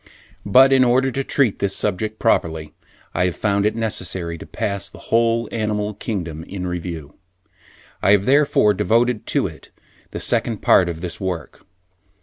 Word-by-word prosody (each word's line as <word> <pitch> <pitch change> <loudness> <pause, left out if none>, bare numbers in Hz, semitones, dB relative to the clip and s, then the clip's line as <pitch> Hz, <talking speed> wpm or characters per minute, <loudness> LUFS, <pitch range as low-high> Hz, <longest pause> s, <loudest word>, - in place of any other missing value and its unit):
But 130 +6 +6
in 130 -1 +5
order 130 +2 +2
to 135 +2 -2
treat 130 -6 +1
this 100 -1 0
subject 105 +2 -2
properly, 80 -9 0 0.4
I 90 - +1
have 90 - -1
found 100 -1 +1
it 110 - -1
necessary 95 -6 -2
to - - -10
pass 100 -2 -3
the - - -14 0.2
whole 115 0 +2
animal 105 -1 -2
kingdom 85 -7 -5
in 95 -1 -6
review. 85 -4 -5 0.9
I 100 - +4
have 100 -1 +3
therefore 135 -6 +4
devoted 115 +4 +1
to - - +1
it - - -8 0.4
the - - -6
Second 115 -4 0
Part 90 -2 +5
of 85 -1 -6
this 90 0 -6
work. 90 -4 -5
100 Hz, 160 wpm, -20 LUFS, 90-115 Hz, 0.9 s, But